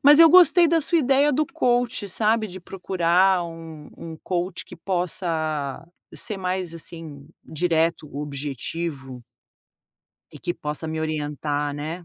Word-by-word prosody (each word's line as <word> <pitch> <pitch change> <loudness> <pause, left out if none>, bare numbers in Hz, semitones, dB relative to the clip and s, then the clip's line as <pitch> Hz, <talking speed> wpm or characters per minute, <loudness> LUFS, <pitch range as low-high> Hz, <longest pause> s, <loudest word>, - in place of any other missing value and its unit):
mas 295 +3 +7
eu 330 - +9
gostei 350 -1 +7
da 330 0 +3
sua 330 +3 +2
ideia 280 +1 +3
do 305 +4 +2
coach, 245 -9 0
sabe, 215 +3 +1
de 185 -1 -9
procurar 185 0 +1
um 165 -3 -10
um 165 -1 -8
coach 180 0 -3
que 180 - -12
possa 160 -5 -2 0.3
ser 210 - -1
mais, 185 -2 -3
assim, 160 -4 -8 0.2
direto, 165 -1 0
objetivo 140 -2 -5 1.1
e - - -8
que 175 - 0
possa 150 +2 -5
me 160 0 -3
orientar, 145 -1 -2
né. 160 +4 -6
170 Hz, 135 wpm, -23 LUFS, 155-205 Hz, 1.1 s, eu